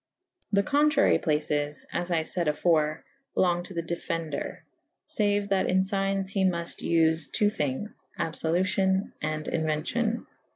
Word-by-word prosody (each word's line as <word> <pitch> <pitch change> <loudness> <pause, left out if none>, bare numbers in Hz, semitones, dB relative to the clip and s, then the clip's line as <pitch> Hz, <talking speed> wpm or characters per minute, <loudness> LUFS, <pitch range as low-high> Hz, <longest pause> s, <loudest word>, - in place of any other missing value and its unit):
The 200 -1 +3
contrary 290 +4 +3
places 150 -1 0
(as 175 0 -2
I 165 -2 +1
fayd 170 +1 -1
afore) 155 0 +2 0.3
long 175 -2 +2
to 190 - -10
the 170 - -1
defender 165 -2 -4 0.2
/ - - -54
faue 205 -1 +1
that 195 -1 +2
in 190 +1 +4
fignes 195 0 0
he 195 -1 0
muft 170 -2 0
vfe 165 -1 +3
.ii. 210 - +5
thinges 150 +4 -3
/ - - -29
abfolutio« 190 +4 +1
and 155 0 -2
inuencio«.' 165 +9 -1
175 Hz, 140 wpm, -27 LUFS, 160-195 Hz, 0.3 s, ii